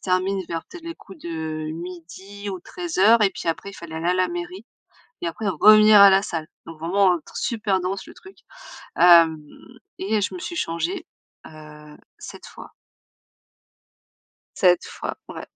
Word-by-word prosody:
termine 185 +1 0
vers 165 -1 -4
peut-être 350 -2 -12
les 335 0 -6
coups 190 -3 -15
de 160 -2 -5
12:00 180 +4 -9
ou 185 -2 -6
13:00, 230 - +2
et 195 - +3
puis - - -6
après, 195 +4 -3
il - - -14
fallait 160 -1 -9
aller 165 +2 -2
à - - +1
la 185 -1 +1
mairie, 175 +4 -7 0.6
et 170 - -2
après 205 +6 -4
revenir 215 +1 +6
à 200 - +10
la 195 +1 +4
salle. 165 -6 -5 0.2
Donc 165 -1 -11
vraiment, 185 +4 +2
un 170 - -2
tr - - -16
super 215 -5 -1
dense 190 +1 -4
le - - -12
truc. 390 0 -16 0.6
Hem, 165 -2 +6 0.6
et 210 +2 -1
je 200 - -2
me - - -7
suis 350 -1 -6
changée, 325 - -3 0.4
heu, 150 -1 -14 0.2
7 - - -11
fois. - - -13 1.8
7 180 -3 +3
fois, - - -6
ouais. - - -8
185 Hz, 170 wpm, -22 LUFS, 165-205 Hz, 1.8 s, à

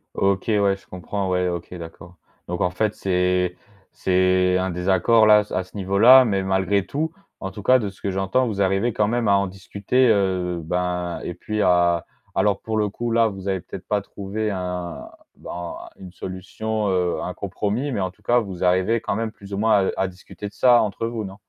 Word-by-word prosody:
OK, 95 -1 +1
ouais. 100 -1 +3
Je 100 - -19
comprends, 95 +2 -4
ouais. 90 0 +1
OK, 85 0 -4
d'accord. 85 +1 -11 0.3
Donc, 90 0 -3
en 90 - +2
fait, 105 +4 -1
c'est 90 -1 0 0.4
c'est 95 0 +2
un 95 0 -1
désaccord, 95 +5 +3
là 105 0 +7
s 105 - -11
à 95 - -1
ce 95 - -20
niveau-là, 105 +7 +6
mais 100 -4 0
malgré 95 +1 +1
tout,- 155 +3 -2 0.3
en 95 - -4
tout 105 - -9
cas 130 +4 +6
de 105 -4 -3
ce 95 - -17
que 100 - -2
j'entends- 95 +7 +1
vous 100 -3 -2
arrivez 95 +4 +1
quand 105 - +1
même 120 -2 0
à 100 - +5
en 100 0 +1
discuter, 100 +7 0
heu, 95 -5 +1
ben 90 +1 -2
et 90 - -4
puis 105 +4 -3
à 85 -2 +3 0.3
alors 100 -2 +1
pour 110 -1 -3
le 105 -1 +2
coup, 120 +3 -4
là, 115 0 +4
vous 95 -1 -5
avez 95 -1 0
peut-être - - -10
pas 105 -1 +1
trouvé 100 +2 -4
un 90 -2 -5 0.3
ben, 85 0 -7 0.2
une 95 -2 -10
solution, 105 +4 -4
heu, 90 -2 0
un 90 - -4
compromis, 105 +7 -3
mais 110 - -2
en 95 -1 -1
tout 105 - -30
cas, 120 +3 +3
vous 95 -5 -5
arrivez 95 +5 +2
quand - - -2
même, 110 -1 -2
plus 100 -1 -12
ou - - -2
moins, 105 -2 +3
à - - -3
à - - 0
discuter 95 +2 -9
de 100 - -11
ça 120 +3 +5
entre 110 +2 -2
vous. 115 -2 -4
Non? 95 0 -8
95 Hz, 215 wpm, -23 LUFS, 90-105 Hz, 0.4 s, là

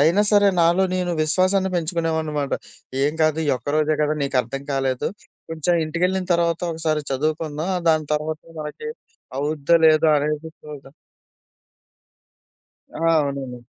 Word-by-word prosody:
అయినా 170 +8 +4
సరే 205 -1 +5
నాలో 170 +3 +4
నేను 180 -1 -1
విశ్వాసాన్ని 185 +4 +2
పెంచుకునేవాడినమట 160 -4 -1 0.5
ఏం 145 +2 +2
కాదు 155 0 +2
ఈ - - -1
ఒక్క 125 +4 -10
రోజే 155 0 +2
కదా 150 0 +1
నీకు 140 -1 -1
అర్థం 135 +4 -6
కాలేదు 135 -2 0 0.4
కొంచెం 165 +2 0
ఇంటికెళ్ళిన 180 +3 -1
తర్వాత 170 0 +1
ఒకసారి 160 -1 -1
చదువుకుందాం, 155 +4 -2 0.2
దాని 155 -2 +2
తర్వాత 155 +1 -3 0.2
మనకి 150 - -6 0.5
అవుద్దా 150 +3 +2
లేదా 155 0 +5
అనేది 150 +2 -2
చూద్దాం. 140 -2 -11 2.0
ఆ! - - -8 0.2
అవునండి. 135 -4 -3
155 Hz, 125 wpm, -22 LUFS, 145-170 Hz, 2.0 s, సరే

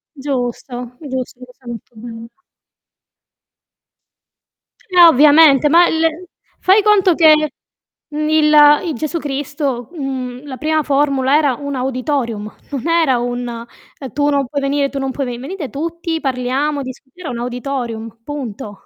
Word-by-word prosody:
Giusto, 250 -2 -4
giusto, 260 -4 -5
lo 250 0 -12
sa 255 0 -26
molto 235 0 -9
bene. 230 0 -9 2.6
Eh, 360 -1 +4
ovviamente, 300 -1 +6
ma 340 +3 +6
il 325 +2 -1 0.3
fai 390 +3 +4
conto 390 -4 +4
che, 320 -1 +6 0.8
mhmm, 305 0 -3
il 305 -1 +4 0.3
i 330 - -2
Gesù 310 +7 -3
Cristo, 280 -4 -3
mhmm, 265 -3 -5
la 265 -2 -7
prima 310 +1 0
formula 275 -1 +2
era 290 -4 +2
un 285 +2 -5
auditorium, 255 -4 -2 0.2
non 275 0 -4
era 325 -7 +3
un, 245 0 -3
ehm: 235 +3 -10
"Tu 290 0 +1
non 280 -2 +1
puoi 285 +3 -3
venire, 280 0 0
tu 275 - -4
non 270 0 -2
puoi 270 0 -3
veni" 240 -1 -5
"venite 295 - -6
tutti, 330 +3 -4
parliamo, 270 +3 -1
discut" 260 0 -10
era 350 -6 -6
un 240 - -5
auditorium, 240 -2 -5
punto. 225 -8 -7
275 Hz, 145 wpm, -17 LUFS, 250-305 Hz, 2.6 s, ovviamente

